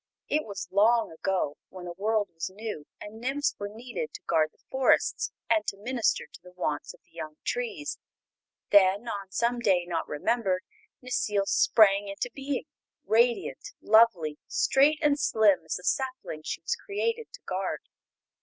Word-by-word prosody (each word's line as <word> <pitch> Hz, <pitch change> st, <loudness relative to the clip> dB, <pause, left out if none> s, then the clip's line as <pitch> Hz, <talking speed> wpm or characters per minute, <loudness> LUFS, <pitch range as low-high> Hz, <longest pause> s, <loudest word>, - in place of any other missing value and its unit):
It 305 Hz, +1 st, 0 dB
was 200 Hz, -2 st, -5 dB
long 220 Hz, +2 st, +4 dB
ago 160 Hz, -3 st, -1 dB
when 185 Hz, -1 st, -9 dB
the 175 Hz, -, -5 dB
world 210 Hz, +3 st, 0 dB
was 165 Hz, +2 st, -4 dB
new 205 Hz, -6 st, -6 dB
and 220 Hz, +2 st, -10 dB
nymphs 275 Hz, +4 st, 0 dB
were 205 Hz, 0 st, -4 dB
needed 245 Hz, -, -6 dB
to -, -, -9 dB
guard 155 Hz, -2 st, +2 dB
the -, -, -35 dB
forests 265 Hz, -1 st, +2 dB, 0.2 s
and 220 Hz, -2 st, +3 dB
to 195 Hz, -, -2 dB
minister 235 Hz, +3 st, 0 dB
to -, -, -16 dB
the 180 Hz, 0 st, -15 dB
wants 150 Hz, -5 st, -3 dB
of -, -, -27 dB
the -, -, -35 dB
young 155 Hz, -1 st, -6 dB
trees. 440 Hz, -, -3 dB, 0.7 s
Then, 200 Hz, +3 st, +5 dB
on 200 Hz, -3 st, -4 dB
some 235 Hz, +5 st, 0 dB
day 190 Hz, -6 st, +2 dB
not 170 Hz, -2 st, -2 dB
remembered, 190 Hz, +3 st, 0 dB, 0.4 s
Necile 210 Hz, -5 st, 0 dB
sprang 205 Hz, -1 st, +4 dB
into 200 Hz, +5 st, -4 dB
being; 275 Hz, 0 st, -3 dB, 0.4 s
radiant, 220 Hz, -, +1 dB
lovely, 205 Hz, -9 st, +4 dB
straight 290 Hz, +3 st, +3 dB
and 290 Hz, -1 st, +3 dB
slim 210 Hz, -, +3 dB
as 160 Hz, -, -2 dB
the 180 Hz, -, -7 dB
sapling 255 Hz, -, -2 dB
she -, -, -4 dB
was -, -, -1 dB
created 455 Hz, +3 st, -3 dB
to -, -, -10 dB
guard. -, -, -2 dB
215 Hz, 165 wpm, -28 LUFS, 185-250 Hz, 0.7 s, Then